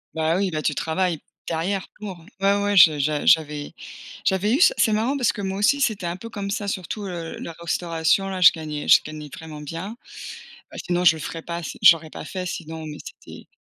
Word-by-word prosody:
Bah 160 +2 +1
oui, 195 -2 0
bah 155 -1 -2
tu 150 - 0
travailles 165 0 -1 0.3
derrière 180 +4 -2
pour 195 -5 -7 0.2
ouais 200 +1 +3
ouais, 205 -1 +1
je 155 -4 +7
j'a 150 +1 0
j'avais 150 -2 +2 0.5
j'avais 195 +4 +1
eu 295 - +2
ça - - +7
c'est 220 -4 +3
marrant 240 +7 0
parce 245 -5 +2
que 205 - -6
moi 190 0 -3
aussi 280 +8 +3
c'était 210 -8 0
un 170 +1 -2
peu 230 +4 -9
comme 200 -2 -5
ça, 205 -1 -3
surtout, 195 +3 -4
heu, 170 -2 -6
la 170 - -6
restauration 170 +2 0
là, 190 -1 -4
je 180 - +9
gagnais 155 -2 -6
je - - +7
gagnais 155 -1 -8
vraiment 160 -3 -9
bien. 165 +10 -6 0.8
Heu, - - -8
sinon 180 0 0
je 160 -2 +6
le - - -8
ferais 165 +2 -6
pas 170 0 -5
si - - -7
j'aurais 165 -2 +6
pas - - -9
fait, 185 -1 -5
sinon, 160 -2 -6
mais 150 -1 -7
c'était - - -12
175 Hz, 220 wpm, -23 LUFS, 160-200 Hz, 0.8 s, je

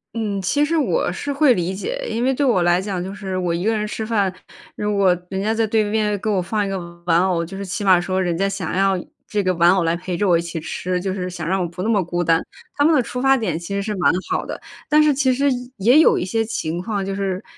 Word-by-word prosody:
嗯， 210 -3 -2
其 290 +11 +1
实 330 +3 -1
我 325 - +1
是 285 - -4
会 280 -2 +4
理 180 -2 -2
解。 - - -4
因 235 +2 -2
为 265 - +2
对 285 +2 -1
我 230 -10 +3
来 175 +1 +3
讲 190 -3 -3
就 190 +1 -6
是 195 -2 -4
我 180 -2 -1
一 170 +1 -2
个 220 +1 +1
人 210 - -1
吃 215 +1 -4
饭， 205 -4 0 0.4
如 210 -1 -1
果 190 -3 +4
人 190 - -3
家 215 +2 0
在 225 -1 +1
对 220 0 +2
面 210 -1 0
给 220 - -5
我 195 -3 +1
放 205 +3 -1
一 - - -3
个 195 -1 -2 0.3
玩 170 0 +3
偶， 175 -3 0
就 190 +4 -9
是 200 - -5
起 195 +3 -4
码 185 -3 +5
说 185 +1 -1
人 175 -2 0
家 195 +3 0
想 195 -4 -4
要 195 0 +2 0.3
这 205 -2 -1
个 185 - +1
玩 170 +1 +5
偶 185 -1 +2
来 165 0 +1
陪 180 0 -4
着 205 - +1
我 175 - +4
一 165 - +2
起 170 -1 -5
吃， 180 +3 -3
就 190 +1 -2
是 185 -1 -3
想 170 -3 -6
让 190 +1 +1
我 175 - -1
不 175 +2 -6
那 220 - -1
么 205 -4 +2
孤 175 +1 -2
单， 165 0 +2 0.3
他 285 - +2
们 315 - +5
的 260 - +3
出 250 +1 -5
发 270 0 +4
点 185 -9 -2
其 175 +4 -5
实 200 - -1
是 210 +1 -3
蛮 180 - +3 0.2
好 - - 0
的。 - - -5 0.3
但 300 0 +5
是 300 -1 +4
其 265 -1 +2
实， 275 +3 +1 0.3
也 225 +5 +4
也 305 - +7
有 - - +5
一 - - -1
些 225 +4 0
情 175 -6 -3
况 200 -1 -3
就 195 - -3
是， 195 -1 -2
195 Hz, 310 characters per minute, -21 LUFS, 180-220 Hz, 0.4 s, 也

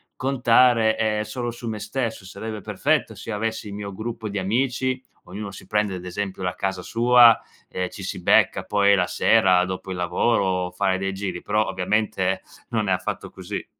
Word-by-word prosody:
contare, 120 -3 +3
ehm, 105 -1 0
solo 120 +2 -4
su 120 0 -8
me 110 - -3
stesso, 110 0 -3
sarebbe 110 +3 -6
perfetto - - 0
se 115 - -7
io - - -2
avessi 110 0 -3
il - - -7
mio 100 -1 -6
gruppo 110 +1 -5
di 100 0 -3
amici, 130 +5 0 0.2
ognuno 105 -1 -7
si 95 - -12
prende 105 -1 0
ad 90 0 -8
esempio 95 +1 -4
la 90 0 -2
casa 95 -1 -2
sua, 120 +1 +6 0.3
ehm, 90 -1 -3
ci - - -10
si - - -5
becca - - +3
poi 100 -1 +3
la 90 -2 +1
sera 95 -5 +4
dopo 95 +1 -5
il 90 - -4
lavoro, 90 0 +1
fare 95 +1 0
dei 95 +1 -2
giri 95 -3 -4
però 105 +1 0
ovviamente 95 0 0 0.3
non 110 -3 -1
è 95 - +3
affatto 90 0 -3
così. - - -6
105 Hz, 185 wpm, -23 LUFS, 95-115 Hz, 0.3 s, sua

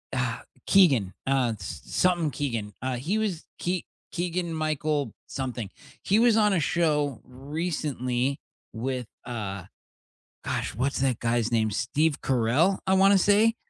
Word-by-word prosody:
Uh, - - -1 0.3
Keegan, 135 - +5 0.2
uh, 130 -4 +2
s 95 - -6
something 175 -5 +1
Keegan, 115 -8 -3
uh, 130 -1 -1
he 160 - -1
was 205 -7 -2
Kee 180 0 -1 0.3
Keegan 175 -1 -2
Michael 155 -2 -1 0.2
something, 125 -6 -4 0.3
he 205 +3 +3
was 235 -1 +5
on 210 -2 +4
a 175 - +2
show 150 -5 +1
recently 135 -2 -2 0.3
with, 125 +1 -3 0.2
uh 100 -6 -5 0.8
gosh, - - -2
what's 135 +4 0
that 130 -3 +1
guy's 120 -1 0
name? 110 -2 +2
Steve 140 +9 0
Carell, 135 +10 +2
I 190 - +3
wanna 195 +1 +6
say? 210 +4 +4
145 Hz, 135 wpm, -27 LUFS, 125-175 Hz, 0.8 s, wanna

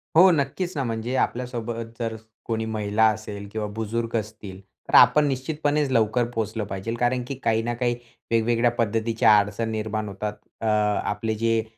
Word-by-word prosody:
हो, 180 +4 +8
नक्कीच 165 +5 -1
ना. 135 - 0
म्हणजे 115 +2 -3
आपल्यासोबत 120 -2 -2
जर 115 -1 -2 0.3
कोणी 110 -1 -2
महिला 110 0 +1
असेल 105 -1 -7
किंवा 110 0 -3
बुजुर्ग 115 +1 -2
असतील, 105 -3 -6 0.3
तर - - +1
आपण 150 0 +7
निश्चितपणेच 145 +2 0
लवकर 115 0 +2
पोहोचलं 110 0 -2
पाहिजे, 100 +5 -4
कारण 125 +1 +1
की 135 - -4
काही 110 0 +2
ना 120 +1 -1
काही 120 0 0 0.4
वेगवेगळ्या 115 +1 +3
पद्धतीच्या 115 -1 +3
अडचण 105 +3 -2
निर्माण 110 -1 -2
होतात. 105 +2 -4 0.3
अ - - -3 0.5
आपले 110 +1 -2
जे 115 0 +1
115 Hz, 160 wpm, -24 LUFS, 110-120 Hz, 0.5 s, हो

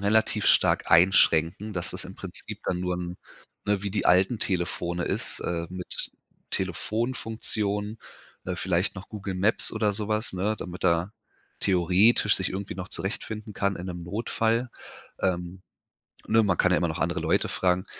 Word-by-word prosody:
relativ 110 +2 +2
stark - - +4
einschränken, 85 +2 +4
dass 90 -3 -2
das - - -3
im - - -10
Prinzip - - -7
dann 90 -1 -1
nur 90 -1 -1
'n 90 0 -5 0.5
ne, 100 -1 +1
wie 100 - -2
die 105 - 0
alten 95 +5 +4
Telefone 85 -1 -1
ist, - - -1
äh, 85 -1 -3
mit 90 -1 -4 0.4
Telefonfunktion, 110 +1 -1 0.5
äh, 90 0 -3
vielleicht 90 +2 0
noch 95 - -9
Google 100 -3 -5
Maps 100 +5 +3
oder 110 -2 +1
so 105 +1 -3
was, 110 +1 0
ne, 100 +4 -1
damit 90 0 -7
er 85 +2 +2 0.5
theoretisch 95 +4 +4
sich 95 - 0
irgendwie 100 0 -4
noch 95 +1 -6
zurechtfinden 105 +2 -3
kann 100 -1 0
in 90 - -6
'nem 90 -1 -5
Notfall, 115 +5 0 0.5
ähm. 90 0 -2 0.7
Ne, 110 +1 +5
man 95 -5 +1
kann 95 - +3
ja 90 - +4
immer 85 - +1
noch 80 - -3
andere - - 0
Leute - - +1
fragen 90 +1 +1
95 Hz, 165 wpm, -27 LUFS, 90-105 Hz, 0.7 s, Ne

